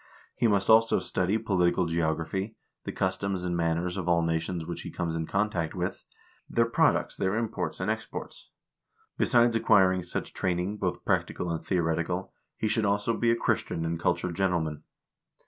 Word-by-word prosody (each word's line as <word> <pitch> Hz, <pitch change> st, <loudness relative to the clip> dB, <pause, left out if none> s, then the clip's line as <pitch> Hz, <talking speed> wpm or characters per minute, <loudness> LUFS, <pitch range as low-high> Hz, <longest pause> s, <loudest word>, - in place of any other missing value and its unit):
He 120 Hz, -, +2 dB
must 100 Hz, -3 st, +2 dB
also 115 Hz, +1 st, +6 dB
study 95 Hz, +4 st, 0 dB
political 95 Hz, -4 st, +1 dB
geography, 85 Hz, +5 st, -1 dB, 0.3 s
the -, -, -3 dB
customs 95 Hz, 0 st, -1 dB
and 90 Hz, -1 st, -1 dB
manners 85 Hz, +2 st, 0 dB
of 90 Hz, -2 st, -3 dB
all 85 Hz, -1 st, +3 dB
nations 80 Hz, +1 st, -1 dB
which 85 Hz, +1 st, -5 dB
he -, -, -7 dB
comes 85 Hz, -1 st, -3 dB
in 80 Hz, -1 st, -2 dB
contact 100 Hz, -5 st, -1 dB
with; -, -, -3 dB, 0.5 s
their 115 Hz, -, +3 dB
products, 115 Hz, -, +2 dB
their 95 Hz, +2 st, 0 dB
imports 115 Hz, -1 st, -2 dB
and -, -, 0 dB
exports. -, -, -6 dB, 0.7 s
Besides 120 Hz, -1 st, +4 dB
acquiring 95 Hz, -5 st, +4 dB
such 85 Hz, -, -4 dB
training, 90 Hz, +3 st, -1 dB
both 90 Hz, -3 st, -3 dB
practical 90 Hz, -, 0 dB
and 80 Hz, -, -3 dB
theoretical, 85 Hz, +1 st, -1 dB, 0.2 s
he 110 Hz, -, -1 dB
should 110 Hz, +1 st, +1 dB
also 105 Hz, +3 st, +1 dB
be 115 Hz, -, +1 dB
a 115 Hz, -, +4 dB
Christian 80 Hz, -7 st, -1 dB
and 80 Hz, 0 st, -2 dB
cultured 90 Hz, 0 st, 0 dB
gentleman. 85 Hz, -6 st, 0 dB
90 Hz, 165 wpm, -28 LUFS, 85-105 Hz, 0.7 s, also